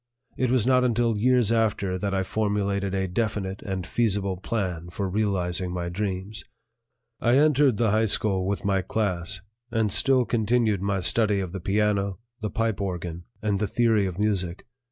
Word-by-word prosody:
It 130 Hz, -, 0 dB
was 125 Hz, -3 st, +2 dB
not 130 Hz, 0 st, +4 dB
until 120 Hz, -2 st, +1 dB
years 120 Hz, 0 st, +3 dB
after 105 Hz, -4 st, +1 dB
that 100 Hz, +2 st, -2 dB
I 95 Hz, 0 st, 0 dB
formulated 100 Hz, -1 st, -1 dB
a 95 Hz, 0 st, 0 dB
definite 100 Hz, -1 st, -2 dB
and 95 Hz, -3 st, -4 dB
feasible 100 Hz, -3 st, 0 dB
plan 90 Hz, -4 st, -3 dB
for 95 Hz, +3 st, -3 dB
realizing 90 Hz, -3 st, -1 dB
my 90 Hz, -1 st, -3 dB
dreams. 95 Hz, +2 st, -4 dB, 0.8 s
I 120 Hz, +2 st, +3 dB
entered 145 Hz, -5 st, +4 dB
the 115 Hz, -2 st, +2 dB
high 110 Hz, +1 st, +3 dB
school 100 Hz, -3 st, +2 dB
with 100 Hz, 0 st, -2 dB
my 95 Hz, -1 st, +2 dB
class, 95 Hz, -3 st, -1 dB, 0.3 s
and 110 Hz, -2 st, 0 dB
still 130 Hz, +2 st, +3 dB
continued 110 Hz, -3 st, +1 dB
my 100 Hz, -1 st, 0 dB
study 105 Hz, +2 st, +2 dB
of 95 Hz, -3 st, -4 dB
the 95 Hz, -1 st, -6 dB
piano, 100 Hz, 0 st, 0 dB, 0.2 s
the 110 Hz, -2 st, -3 dB
pipe 115 Hz, -2 st, -1 dB
organ, 85 Hz, -3 st, -4 dB, 0.2 s
and 105 Hz, -2 st, 0 dB
the 105 Hz, -, 0 dB
theory 110 Hz, -2 st, +2 dB
of 90 Hz, -2 st, -6 dB
music. 100 Hz, -3 st, -1 dB
100 Hz, 170 wpm, -25 LUFS, 95-110 Hz, 0.8 s, not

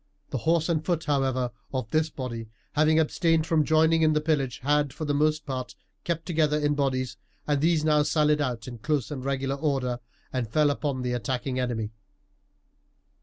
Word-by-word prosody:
The 130 Hz, -, -1 dB
horse 165 Hz, -1 st, +3 dB
and 160 Hz, -3 st, 0 dB
foot, 165 Hz, -1 st, 0 dB
however, 130 Hz, -4 st, 0 dB, 0.2 s
of 130 Hz, -5 st, -3 dB
this 155 Hz, 0 st, +2 dB
body, 120 Hz, -6 st, -6 dB, 0.2 s
having 155 Hz, +1 st, +4 dB
abstained 160 Hz, 0 st, +2 dB
from 160 Hz, -2 st, +3 dB
joining 160 Hz, +1 st, +4 dB
in 155 Hz, -1 st, +4 dB
the 150 Hz, -, +3 dB
pillage, 150 Hz, -5 st, 0 dB
had, 145 Hz, 0 st, +2 dB
for 155 Hz, -, -5 dB
the 145 Hz, -, 0 dB
most 155 Hz, +1 st, +1 dB
part, 130 Hz, -3 st, -4 dB, 0.3 s
kept 165 Hz, -1 st, -2 dB
together 155 Hz, -3 st, +2 dB
in 145 Hz, -1 st, +1 dB
bodies, 130 Hz, -3 st, -1 dB, 0.3 s
and 145 Hz, -2 st, +1 dB
these 160 Hz, -1 st, +2 dB
now 150 Hz, -1 st, +4 dB
sallied 150 Hz, 0 st, +2 dB
out 125 Hz, -5 st, -2 dB
in 120 Hz, -2 st, -7 dB
close 145 Hz, +1 st, -1 dB
and 135 Hz, -3 st, -5 dB
regular 135 Hz, 0 st, -1 dB
order, 135 Hz, -4 st, -1 dB, 0.3 s
and 125 Hz, -4 st, -1 dB
fell 150 Hz, +4 st, +3 dB
upon 140 Hz, -3 st, -2 dB
the 125 Hz, 0 st, -1 dB
attacking 125 Hz, +2 st, -2 dB
enemy. 115 Hz, -4 st, -2 dB
145 Hz, 180 wpm, -27 LUFS, 130-155 Hz, 0.3 s, having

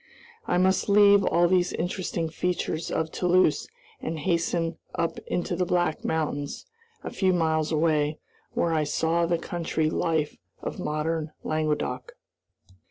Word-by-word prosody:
I -, -, +2 dB
must 190 Hz, +2 st, +2 dB
leave 200 Hz, 0 st, +6 dB
all 175 Hz, -1 st, +3 dB
these 180 Hz, 0 st, +2 dB
interesting 175 Hz, -1 st, -2 dB
features 165 Hz, 0 st, -2 dB
of 160 Hz, 0 st, -1 dB
Toulouse 180 Hz, -3 st, +2 dB, 0.3 s
and 160 Hz, +1 st, -3 dB
hasten 165 Hz, 0 st, 0 dB, 0.2 s
up 165 Hz, 0 st, -1 dB
into 175 Hz, 0 st, -1 dB
the 180 Hz, -, +1 dB
Black 175 Hz, -3 st, 0 dB
Mountains, 145 Hz, -3 st, -2 dB, 0.4 s
a -, -, -5 dB
few 190 Hz, -2 st, +2 dB
miles 160 Hz, -2 st, +1 dB
away, 155 Hz, -1 st, +2 dB, 0.4 s
where 170 Hz, -1 st, +1 dB
I 155 Hz, -1 st, +2 dB
saw 165 Hz, +3 st, +1 dB
the 170 Hz, 0 st, +1 dB
country 165 Hz, -2 st, -1 dB
life 160 Hz, -3 st, 0 dB, 0.2 s
of -, -, -5 dB
modern 155 Hz, +1 st, -2 dB
Languedoc. 150 Hz, -5 st, -2 dB
165 Hz, 135 wpm, -26 LUFS, 155-175 Hz, 0.4 s, leave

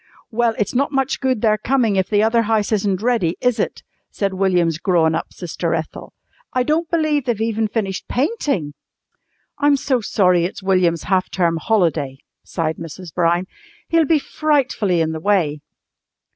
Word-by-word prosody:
"Well, 230 Hz, 0 st, +1 dB
it's 210 Hz, -, -1 dB
not 275 Hz, +4 st, +1 dB
much 270 Hz, -2 st, 0 dB
good 260 Hz, -5 st, 0 dB
their 215 Hz, -2 st, +2 dB
coming 240 Hz, -6 st, +1 dB
if 190 Hz, -1 st, 0 dB
the 210 Hz, 0 st, +3 dB
other 230 Hz, +1 st, +3 dB
house 220 Hz, -1 st, 0 dB
isn't 200 Hz, -2 st, 0 dB
ready, 225 Hz, -9 st, +1 dB
is 250 Hz, -2 st, +1 dB
it?" -, -, -2 dB, 0.3 s
said 195 Hz, -2 st, -2 dB
William's 180 Hz, -4 st, +1 dB
grown 170 Hz, -3 st, +2 dB
up -, -, -3 dB
sister 175 Hz, -3 st, -3 dB
Ethel. -, -, -6 dB, 0.4 s
"I 255 Hz, -, +2 dB
don't 315 Hz, +4 st, 0 dB
believe 310 Hz, -4 st, +1 dB
they've 240 Hz, -4 st, -1 dB
even 225 Hz, 0 st, 0 dB
finished 200 Hz, -3 st, -3 dB
painting!" 260 Hz, -, -1 dB, 0.9 s
"I'm 290 Hz, 0 st, +4 dB
so 260 Hz, -3 st, 0 dB
sorry 180 Hz, -4 st, +2 dB
it's 185 Hz, +2 st, -4 dB
William's 180 Hz, -4 st, +2 dB
half 185 Hz, -1 st, 0 dB
term 170 Hz, -3 st, +1 dB
holiday," 165 Hz, -9 st, 0 dB, 0.3 s
sighed 160 Hz, -2 st, -3 dB
Mrs. 165 Hz, 0 st, -9 dB
Brown. 175 Hz, +1 st, +1 dB, 0.4 s
"He'll 330 Hz, -1 st, +3 dB
be 315 Hz, +2 st, +3 dB
frightfully 270 Hz, -, 0 dB
in 160 Hz, 0 st, 0 dB
the 160 Hz, -, -4 dB
way." 160 Hz, -6 st, +1 dB
205 Hz, 165 wpm, -20 LUFS, 175-250 Hz, 0.9 s, I'm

